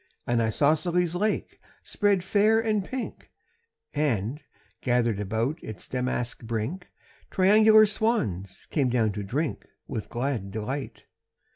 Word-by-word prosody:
An 120 -1 +1
isosceles 160 +9 +2
lake 210 +4 -1 0.2
spread 200 -3 +1
fair 210 +3 +3
and 215 -3 +1
pink, 255 +5 -6 0.6
And, 140 -2 -1 0.4
gathered 120 -4 +1
about 110 - -1
its 110 -4 -8
damask 125 -1 -2
brink, 115 - -4 0.4
Triangular 215 +3 +6
swans 110 - -1
came 140 -5 +2
down 115 -3 +2
to 105 +1 -4
drink 135 +10 -2 0.2
With 115 -6 -5
glad 120 -5 -2
delight. 120 +7 -5
140 Hz, 115 wpm, -27 LUFS, 110-190 Hz, 0.6 s, Triangular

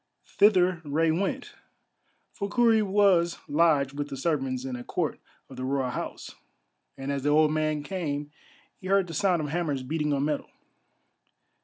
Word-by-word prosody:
Thither 185 -4 +3
Rei 160 +2 +1
went, 185 +4 -2 0.8
for 200 -2 -4
Kurri 230 -1 +4
was 190 -4 +3
lodged 145 -3 +2
with 145 0 -3
the 135 - -7
servants 135 -4 -1
in 130 -1 -4
a 120 - -7
court - - -2 0.3
of - - -12
the 130 - -5
Royal 130 -1 -1
House, - - -6 0.6
and 135 +1 -4
as 140 -1 -2
the 145 - 0
old 155 +1 +4
man 155 -1 0
came 145 -4 -4 0.5
he 185 - -8
heard 195 0 +3
the 165 - -8
sound 175 -1 +1
of 150 - -4
hammers 150 -5 -2
beating 150 +2 -1
on 140 0 +1
metal. 150 -1 -2
155 Hz, 165 wpm, -27 LUFS, 140-180 Hz, 0.8 s, Kurri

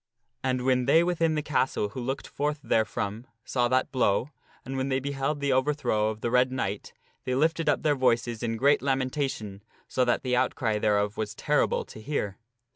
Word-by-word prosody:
And 130 -1 0
when 125 -1 +2
they 160 +5 +5
within 165 -2 +1
the 150 - -1
castle 135 -7 0
who 125 - -6
looked 135 +3 -3
forth 150 +1 -2
therefrom, 110 0 -1 0.2
saw 120 -2 +1
that 130 +1 +1
blow, 125 +1 +1 0.3
and 135 +2 -5
when 130 +1 -1
they 130 0 +1
beheld 140 +2 -2
the 140 -1 +1
overthrow 130 -6 +1
of 110 0 -6
the 120 - -1
Red 125 +1 +3
Knight, 105 -6 -3 0.3
they 130 - -1
lifted 160 +4 +1
up - - +1
their 150 - +3
voices 120 -3 +1
in 115 -1 -2
great 140 +4 +4
lamentation 130 -6 -2 0.3
so 130 - +1
that 120 -1 +1
the 125 -1 +1
outcry 120 -3 0
thereof 105 0 +1
was 110 -1 -3
terrible - - +1
to 110 - -11
hear. 105 -6 -3
130 Hz, 190 wpm, -27 LUFS, 110-140 Hz, 0.3 s, they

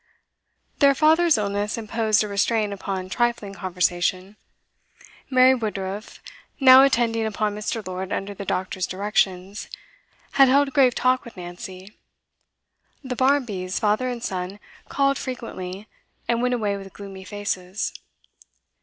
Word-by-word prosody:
Their 280 -1 +5
father's 320 +2 +4
illness 205 +1 -1
imposed 220 -1 +1
a - - -3
restraint 205 +1 0
upon 190 -1 -4
trifling 235 -1 -1
conversation. 185 +1 -1 0.9
Mary 255 0 +6
Woodruff, 210 -3 -5 0.4
now 260 -1 +9
attending 235 -4 +2
upon 215 -1 -1
Mr. 210 +1 -4
Lord 185 +1 -5
under 200 +1 -3
the 200 - -7
doctor's 185 -1 -2
directions, 195 0 -1 0.6
had 275 -1 +6
held 275 +1 +3
grave 260 -4 +4
talk 255 0 +2
with 235 - -13
Nancy. 185 +2 -9 1.1
The 260 -2 -4
Barmbys, 240 -9 0
father 215 +4 +1
and 240 -1 -5
son, 185 -1 -4 0.3
called 275 0 +1
frequently, 210 -6 -6 0.4
and 235 0 +1
went 250 0 +1
away 205 -4 -1
with 195 -1 -10
gloomy 195 -2 -9
faces. 190 -1 -4
210 Hz, 125 wpm, -23 LUFS, 190-250 Hz, 1.1 s, now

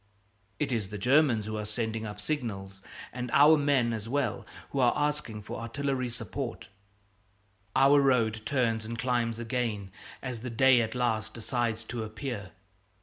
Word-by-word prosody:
It 150 - -1
is 110 -5 -1
the 105 - -5
Germans 125 -1 +3
who 110 0 -3
are - - -3
sending 110 +1 -3
up 105 0 -7
signals, 100 -8 -4 0.3
and 125 0 -4
our 150 +3 +8
men 140 -5 +2
as 110 0 -5
well 120 -4 -1 0.2
who 140 - -1
are 125 -2 +5
asking 145 -8 -1
for - - -6
artillery 130 +2 -2
support. 115 -4 -5 1.1
Our 140 +2 +6
road 115 -5 +2
turns 115 -4 +1
and 115 +1 -5
climbs 115 -1 0
again 115 -4 -2 0.3
as 125 -3 -4
the 125 +3 -5
day 130 +1 +5
at 110 +1 -3
last 110 -3 -1
decides 115 -1 -1
to 115 +1 -5
appear. 110 -1 -5
115 Hz, 155 wpm, -29 LUFS, 110-130 Hz, 1.1 s, our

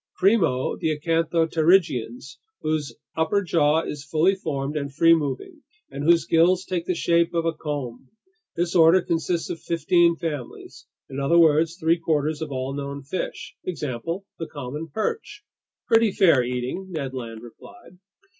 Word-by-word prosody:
Primo, 180 - +2
the 155 -2 -1
acanthopterygians, 165 -5 +1 0.2
whose 150 -6 -2 0.2
upper 160 +6 +1
jaw 160 -3 +2
is 150 -3 -6
fully 160 +6 +2
formed 150 -6 -4
and 140 -2 -3
free 165 +4 +5
moving, 160 - -3 0.3
and 140 - -5
whose 170 +1 +4
gills 175 +3 +3
take 175 -2 -3
the 180 - 0
shape 170 0 +1
of 165 -1 0
a 165 - +1
comb. 140 -6 -6 0.5
This 170 0 -1
order 170 +2 +6
consists 165 +1 -1
of 165 - -5
fifteen 170 0 +2
families, 150 -7 -7 0.2
in 135 - -6
other 140 +5 +2
words, 165 +1 +4
three 165 0 +2
quarters 155 -1 -1
of 155 -2 -4
all 130 0 -3
known 140 0 -5
fish. 175 +7 -5
Example: 165 +3 -4
the 165 - -4
common 145 +2 -6
perch." 320 - -4 0.4
"Pretty 225 -2 +4
fair 170 - +4
eating," 125 +9 -4
Ned 140 -7 -4
Land 115 -3 -7
replied. 175 - -15
160 Hz, 150 wpm, -24 LUFS, 140-170 Hz, 0.5 s, order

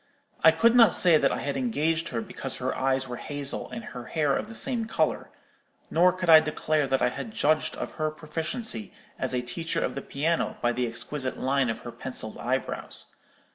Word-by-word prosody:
I - - +9
could 230 +9 +4
not 230 -3 +7
say 170 -4 +6
that 135 - +3
I - - -2
had 140 - -2
engaged 165 - 0
her 115 -3 -2
because - - -3
her - - -2
eyes 135 0 0
were 125 0 -5
hazel, 145 -1 -3
and 230 +1 -7
her 125 - -8
hair 150 -4 +1
of - - -3
the 225 - -8
same 240 -3 0
colour; 220 - -1 0.6
nor 180 +2 +5
could 185 -1 -4
I 160 -1 +10
declare 155 -1 0
that 135 0 +1
I - - +4
had 175 - -6
judged 155 +1 +1
of - - -5
her 155 - +2
proficiency 155 - -5 0.3
as - - -1
a 125 - -1
teacher 160 +8 -3
of - - -3
the 140 - -5
piano 160 +6 -1
by 120 - +1
the 125 0 -1
exquisite 130 +3 -4
line 135 -1 +1
of 115 - -2
her 120 - -5
pencilled 115 -3 -6
eyebrows. 130 +2 -3
150 Hz, 205 wpm, -27 LUFS, 130-170 Hz, 0.6 s, I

